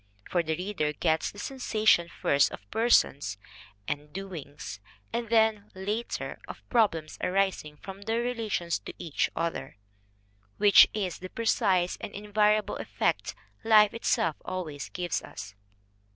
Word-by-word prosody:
For 175 - +3
the 160 -1 -2
reader 180 -5 -2
gets 160 +1 +1
the - - -13
sensation 215 -7 +2
first 140 -3 +2
of - - -10
persons 145 - +3 0.5
and 150 +1 -4
"doings" 165 - -7 0.3
and 235 -1 -2
then, 220 -2 +3
later, 210 +5 -3
of - - -10
problems 185 -10 +1
arising 185 -6 0
from 195 +5 -9
their 225 +3 -1
relations 225 -8 -1
to - - -9
each 160 -4 -1
other; 165 -10 -3 0.8
which 205 -1 +8
is 190 -5 -2
the 185 - -7
precise 195 -6 +1
and - - -6
invariable 210 +1 +1
effect - - -1 0.3
life 215 -1 +6
itself 165 -8 0
always 155 -6 -5
gives 175 -3 -2
us. 100 +1 -9
195 Hz, 130 wpm, -28 LUFS, 165-215 Hz, 0.8 s, which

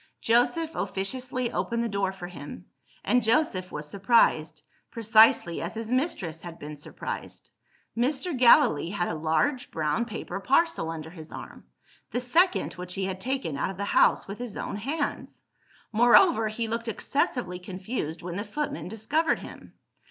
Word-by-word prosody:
Joseph 245 +8 +2
officiously 250 +5 -2
opened 235 0 -1
the - - 0
door 200 -3 -1
for 190 -2 -8
him; 145 - -9 0.4
and 250 - +3
Joseph 220 -6 +1
was 150 0 -5
surprised, 160 -6 +2 0.3
precisely 220 -5 +4
as 170 +6 -5
his 225 +1 -5
mistress 190 - -1
had 170 -1 -9
been 150 +1 -8
surprised. 145 - -7 0.4
Mr. 270 +7 0
Gallilee 240 - +5
had 185 -2 -1
a - - -2
large 160 - 0
brown 160 +8 -1
paper 195 -5 -5
parcel 275 - +2
under 160 -1 -6
his 160 -3 -11
arm - - -10 0.4
the - - -2
second 335 +10 +2
which 180 0 -6
he 190 -1 -1
had 190 0 -4
taken 260 - -2
out - - 0
of 190 - -7
the 200 - -2
house - - +3
with 200 +2 -7
his 245 -4 -6
own - - -4
hands! 285 +7 -3 0.5
Moreover, 240 - +5
he 225 +2 -3
looked 230 +1 -3
excessively 225 -5 -1
confused 185 -2 -5
when 175 +1 -5
the 205 - -2
footman 215 - -4
discovered 255 - 0
him. - - -11
215 Hz, 160 wpm, -27 LUFS, 175-250 Hz, 0.5 s, Gallilee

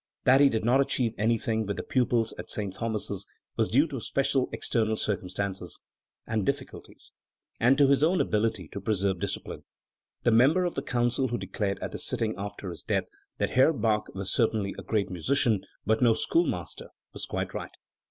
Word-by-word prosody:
That 135 +2 +6
he 140 - +7
did 110 -3 -1
not 130 +3 +4
achieve 125 -4 0
anything 110 0 +1
with 100 - -3
the - - -3
pupils 120 -3 +1
at, - - -7
St. 100 -3 -2
Thomas's 100 -2 -3 0.3
was 110 -1 +1
due 140 +7 +4
to 135 -3 -4
special 135 0 0
external 110 -2 0
circumstances 95 -2 -3 0.5
and 110 -2 -1
difficulties, 140 +4 -5 0.5
and 125 +4 +4
to 145 - +6
his 140 0 +3
own 165 +5 +4
inability 105 - 0
to 100 - -6
preserve 100 -2 0
discipline. - - -4 0.6
The 120 - +4
member 140 +11 +5
of 175 - -1
the - - -2
Council 120 +2 0
who 120 0 -2
declared, 100 -4 -2
at - - -4
the - - -5
sitting 110 -1 +2
after 100 -1 -6
his 85 - -8
death, - - 0 0.3
that - - -1
"Herr 130 +6 +5
Bach 110 -5 0
was 95 0 -3
certainly 110 -4 +1
a - - -7
great 100 -4 -1
musician, 110 - +2 0.2
but 110 +2 +2
no 115 -3 +5
schoolmaster", 335 - -1 0.3
was - - -5
quite - - -3
right. - - -6
110 Hz, 180 wpm, -28 LUFS, 100-130 Hz, 0.6 s, he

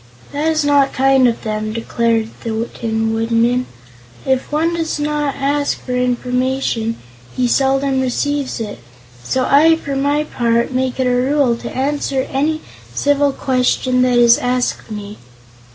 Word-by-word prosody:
"That 295 +2 -1
is 315 -2 +1
not 285 -1 +3
kind 265 -1 +4
of 235 - -2
them," 215 0 -3
declared 230 -1 0
the 225 0 -2
Tin 225 -1 -1
Woodman. 230 +2 +1 0.6
"If 265 +1 0
one 320 +3 +1
does 325 -2 -2
not 295 -1 -1
ask 285 +1 -1
for 250 - -4
information 250 -2 -1 0.4
he 250 -1 +2
seldom 270 +1 +1
receives 275 +1 -1
it; 210 -2 -5 0.4
so 255 - 0
I, 315 +4 +5
for 285 -4 -5
my 285 +2 +1
part, 235 -4 0
make 260 0 -1
it 260 - +2
a 250 - +2
rule 255 0 +2
to - - -7
answer 270 -1 -1
any 310 +3 0 0.3
civil 285 0 +2
question 255 -1 +1
that 250 -1 +3
is 235 -1 +6
asked 250 -1 -1
me." 210 -1 -7
260 Hz, 150 wpm, -17 LUFS, 235-285 Hz, 0.6 s, is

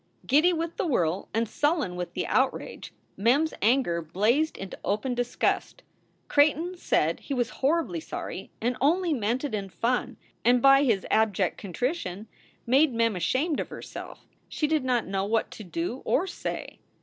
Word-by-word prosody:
Giddy 305 +7 +4
with 335 0 -3
the - - 0
whirl 180 - 0
and 225 +1 0
sullen 290 - 0
with 175 -1 -5
the - - -2
outrage, - - -1 0.2
Mem 240 +10 +3
s 320 - -3
anger 215 -7 +2
blazed 215 - +1
into 195 - -7
open 215 +6 -1
disgust. 245 - -1 0.4
Creighton 310 +5 +3
said 165 - +1
he 280 - -4
was 245 -1 0
hor 325 +5 +3
ribly 335 -2 -5
sorry - - -6
and 245 +2 0
only 335 +4 +2
meant 235 +1 -1
it 285 -6 -3
in 200 -2 -3
fun, 245 +6 -1 0.3
and 245 +2 +5
by 275 +2 +6
his 225 -8 +1
abject 205 -5 +2
contrition 210 - -3 0.4
made 265 +2 +4
Mem 230 -2 +2
ashamed 260 - 0
of - - -3
herself. - - -9 0.2
She 305 - -1
did 305 -2 +1
not 250 -2 +1
know 195 0 -1
what 220 +2 0
to 215 - -9
do 175 +8 -4
or 355 - +1
say. 380 - -6
245 Hz, 170 wpm, -27 LUFS, 200-295 Hz, 0.4 s, by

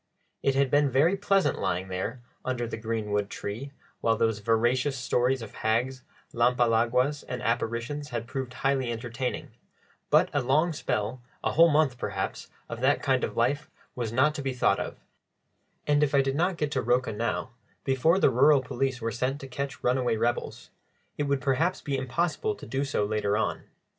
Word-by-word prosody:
It 135 - +1
had 135 -1 +2
been 145 0 +4
very 150 +9 +3
pleasant 195 -1 +1
lying 95 0 -1
there 100 +7 -4 0.2
"under 125 -2 -2
the 115 - -4
greenwood 105 -2 -2
tree," 115 +8 -5 0.3
while 115 -1 +2
those 115 -2 +1
veracious 120 +6 +1
stories 125 +1 +1
of 110 - -10
hags, 125 +4 0 0.3
lampalaguas, 120 +3 +2
and 125 0 -3
apparitions 120 +5 -2
had 120 -2 -3
proved 130 +1 -4
highly 130 -1 0
entertaining; 120 +2 -4 0.6
but - - +4
a 145 - +2
long 150 +7 +2
spell, 115 -3 -2 0.2
a - - +1
whole 165 +2 +6
month 145 -5 +2
perhaps, 100 -4 -3 0.2
of - - -6
that - - +2
kind - - +2
of - - -3
life 145 +3 +1 0.2
was 120 -3 -3
not 135 +6 +3
to 150 - -4
be 135 -1 -2
thought 125 - +2
of; - - -5 0.9
and 145 0 +3
if 145 -1 +2
I 140 - +6
did 135 0 -1
not 175 +3 +1
get 150 -2 -1
to 135 -3 0
Rocha 125 -1 +1
now, 115 +2 -2 0.3
before 135 +6 +3
the 195 - +4
rural 135 +2 +5
police 130 0 -2
were 115 0 -1
set 130 +3 -1
to 135 - -9
catch 140 +1 -5
runaway 125 -2 +1
rebels, 120 +2 -2 0.4
it 145 - -1
would 140 -1 0
perhaps 155 +7 +1
be 140 - -3
impossible 170 - -1
to - - -11
do 135 +1 -2
so 135 -7 0
later 105 -1 0
on. 110 - -2
130 Hz, 180 wpm, -27 LUFS, 115-140 Hz, 0.9 s, whole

